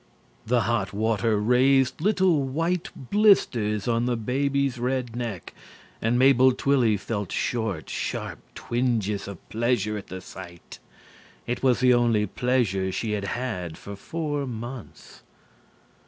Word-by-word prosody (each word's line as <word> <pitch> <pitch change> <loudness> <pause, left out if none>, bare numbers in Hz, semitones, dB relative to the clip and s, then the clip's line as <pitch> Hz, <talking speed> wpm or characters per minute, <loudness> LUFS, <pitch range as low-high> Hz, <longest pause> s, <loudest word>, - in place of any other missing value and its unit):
The 120 +1 +3
hot 105 -2 -1
water 110 0 +1
raised 130 +5 +3
little 185 -5 +3
white 165 +6 -1 0.2
blisters 120 - +3
on 120 0 +1
the 120 -1 0
baby's 135 +2 0
red 125 -1 -2
neck 115 -7 -5 0.5
and 115 +2 +1
Mabel 130 0 +5
Twilly 125 -5 +2
felt 105 -2 -4
short, 110 -9 -2
sharp - - -4 0.2
twinges 115 -5 -1
of 100 -4 -10
pleasure 110 -2 0
at 100 - -12
the 95 - -7
sight. 90 -2 -11 0.7
It 120 - -3
was 130 -2 +2
the 125 -1 +5
only 120 -3 +3
pleasure 105 -4 0
she 110 +3 -2
had 105 -2 -2
had 95 -8 -4
for 100 - -8
four 145 +4 -3
months. 120 0 -8
120 Hz, 130 wpm, -25 LUFS, 105-130 Hz, 0.7 s, Mabel